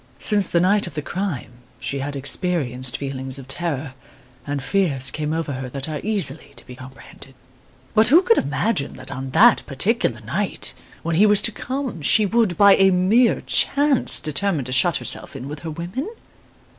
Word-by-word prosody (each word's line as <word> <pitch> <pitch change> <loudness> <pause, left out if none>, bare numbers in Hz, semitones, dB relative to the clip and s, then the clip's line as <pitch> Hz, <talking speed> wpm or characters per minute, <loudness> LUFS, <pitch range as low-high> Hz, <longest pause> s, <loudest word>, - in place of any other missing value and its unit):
Since 205 -3 +2
the 170 - +1
night 195 +3 +3
of 175 - -9
the 150 - -3
crime 175 - -4 0.3
she 140 - -4
had 145 +1 -4
experienced 135 -4 -1
feelings 135 -1 -5
of 135 -2 -11
terror, 145 -2 -2 0.5
and 140 -2 -3
fears 140 -8 0
came 150 0 -3
over 160 -3 -2
her 130 0 -6
that 135 +2 -5
are 155 -2 -5
easily 160 -9 -1
to 120 - -10
be 125 - -11
comprehended. 130 +1 -13 0.6
"But 220 +1 +5
who 325 +9 +6
could 460 +4 +4
imagine 145 +2 -1
that - - -9
on 130 0 -5
that 225 - +5
particular 140 - 0
night 170 - -3 0.3
when 165 -1 -1
he 210 +4 +6
was 205 -1 +5
to 225 - +2
come, 255 - -5
she 215 +8 +4
would, 215 -4 +1
by 200 -1 +7
a 195 0 +5
mere 195 +7 +3
chance, 285 -2 +1
determine 155 -1 -1
to 130 - -6
shut 150 +6 +3
herself - - -5
in 135 0 -7
with 150 +1 -7
her 165 - -7
women? 175 - -5
160 Hz, 180 wpm, -21 LUFS, 135-205 Hz, 0.6 s, by